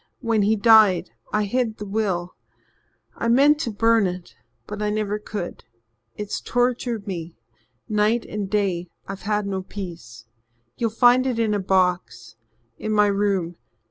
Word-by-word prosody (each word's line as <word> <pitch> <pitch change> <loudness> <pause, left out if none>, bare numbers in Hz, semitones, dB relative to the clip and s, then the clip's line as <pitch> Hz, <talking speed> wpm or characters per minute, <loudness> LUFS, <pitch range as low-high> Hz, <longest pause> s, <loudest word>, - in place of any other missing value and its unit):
When 225 -3 +1
he 210 +2 +3
died 210 - +5 0.2
I 210 0 +1
hid 230 +1 -1
the 210 - -6
will. 195 -4 -2 0.8
I - - -3
meant 280 +5 +5
to 275 - -2
burn 225 -1 +3
it 180 -1 -7 0.3
but 210 0 -6
I 210 - 0
never 210 0 -1
could. 210 -4 -6 0.5
It's 210 -1 -4
tortured 245 -3 -1
me 170 -4 -6 0.5
night 215 +2 +1
and 205 -2 -4
day 190 -4 0 0.2
I've 195 0 -7
had 210 -1 +1
no 195 -1 -2
peace. 170 - -9 0.5
You'll 230 - -1
find 245 +3 +4
it 250 -3 -1
in 225 -2 +1
a 205 - 0
box 180 - 0 0.4
in 215 - -3
my 210 -1 +4
room. 195 -4 0
210 Hz, 150 wpm, -23 LUFS, 190-225 Hz, 0.8 s, died